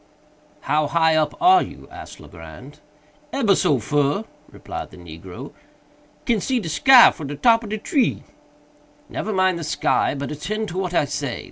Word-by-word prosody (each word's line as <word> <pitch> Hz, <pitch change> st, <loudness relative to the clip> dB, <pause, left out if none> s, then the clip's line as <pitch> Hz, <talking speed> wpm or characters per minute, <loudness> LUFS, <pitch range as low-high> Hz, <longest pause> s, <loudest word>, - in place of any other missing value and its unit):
"How 150 Hz, 0 st, 0 dB
high 160 Hz, +1 st, +2 dB
up 155 Hz, -2 st, -1 dB
are 365 Hz, +1 st, +5 dB
you?" -, -, -9 dB
asked -, -, -11 dB
Legrand. -, -, -13 dB, 0.5 s
"Ebber 230 Hz, -7 st, +2 dB
so 175 Hz, -8 st, +2 dB
fur," 145 Hz, -, 0 dB, 0.3 s
replied -, -, -8 dB
the -, -, -15 dB
negro; 85 Hz, +1 st, -11 dB, 0.7 s
"can 230 Hz, -4 st, +1 dB
see 255 Hz, +3 st, -1 dB
de 175 Hz, -, -6 dB
sky 260 Hz, -, +7 dB
fru 155 Hz, -5 st, -8 dB
de 145 Hz, -, -6 dB
top 230 Hz, -, +3 dB
ob 215 Hz, -, -8 dB
de 215 Hz, -, -3 dB
tree." 255 Hz, +5 st, -1 dB, 0.9 s
"Never 220 Hz, -, -4 dB
mind 185 Hz, -3 st, +1 dB
the -, -, -6 dB
sky, 150 Hz, -, 0 dB
but 140 Hz, 0 st, -5 dB
attend 215 Hz, +8 st, -4 dB
to 180 Hz, -, -4 dB
what 180 Hz, -2 st, -3 dB
I 150 Hz, -, +2 dB
say. 140 Hz, -3 st, -4 dB
170 Hz, 170 wpm, -21 LUFS, 145-220 Hz, 0.9 s, sky